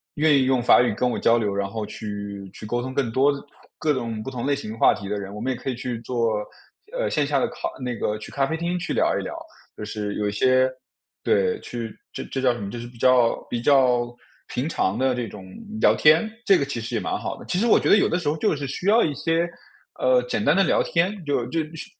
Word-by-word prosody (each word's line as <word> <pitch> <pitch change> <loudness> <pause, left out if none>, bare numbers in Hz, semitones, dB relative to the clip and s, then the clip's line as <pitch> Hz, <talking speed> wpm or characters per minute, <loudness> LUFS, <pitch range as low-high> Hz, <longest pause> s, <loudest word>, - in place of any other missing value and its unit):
愿 155 0 +4
意 135 - +4
用 130 -2 +2
法 120 - +6
语 125 - +1
跟 125 - 0
我 - - -2
交 115 +1 +4
流， 105 -3 0
然 100 0 -2
后 110 +1 -4
去 100 -2 -6
去 - - -9
沟 120 +3 -1
通 130 +1 -5
更 130 -5 0
多 135 +4 +3 0.4
各 155 - +1
种 115 -4 -3
不 135 - -6
同 120 -1 -4
类 145 - +2
型 110 -5 -6
话 - - +5
题 100 -2 -7
的 105 0 -2
人。 100 0 -7
我 105 - -6
们 130 +3 -1
也 130 - -4
可 135 - -4
以 130 - -2
去 120 -1 -4
坐， 115 -3 0 0.6
呃， - - 0
线 150 -2 +1
下 140 -1 +1
的 - - +1
咖 - - -4 0.2
那 125 -2 -3
个 105 -1 -1
去 - - -9
咖 135 -1 +1
啡 160 - -2
厅 175 +2 -2
去 - - -3
聊 - - +2
一 - - -4
聊， - - -6 0.4
就 - - -8
是 105 -1 -4
有 105 -1 0
一 - - -3
些， 130 +4 +3 0.5
对， 460 -1 +2
去 115 -3 -6 0.2
这 - - -5
这 135 - -2
叫 130 -2 +3
什 120 - -7
么 100 - -4
就 120 - -6
是 120 - -7
比 120 - -15
较 125 -1 +4
比 120 -1 -2
较 125 -3 +3 0.3
平 130 +5 -2
常 100 -9 0
的 130 +1 +2
这 120 -2 -3
种 100 -2 -10 0.4
聊 - - +6
天， 155 +8 +5 0.2
这 195 - +6
个 - - 0
其 140 -4 -4
实 115 - -4
也 - - 0
蛮 - - -2
好 - - -4
的。 - - -11
其 180 - +1
实 235 - +2
我 - - +6
觉 - - 0
得 - - +7
有 - - +3
的 175 - 0
时 165 -5 -1
候 155 - -1
就 155 - +1
是 140 - -4
需 180 +8 -4
要 225 +3 +5
一 150 - 0
些， 165 +2 +1 0.5
呃， 130 -1 +4
简 110 -4 -2
单 145 +4 +4
的 195 - +5
聊 - - +3
天， 180 +2 0
就 140 -5 0
就 165 - -1 0.2
社 160 - -5
125 Hz, 290 characters per minute, -24 LUFS, 115-145 Hz, 0.6 s, 得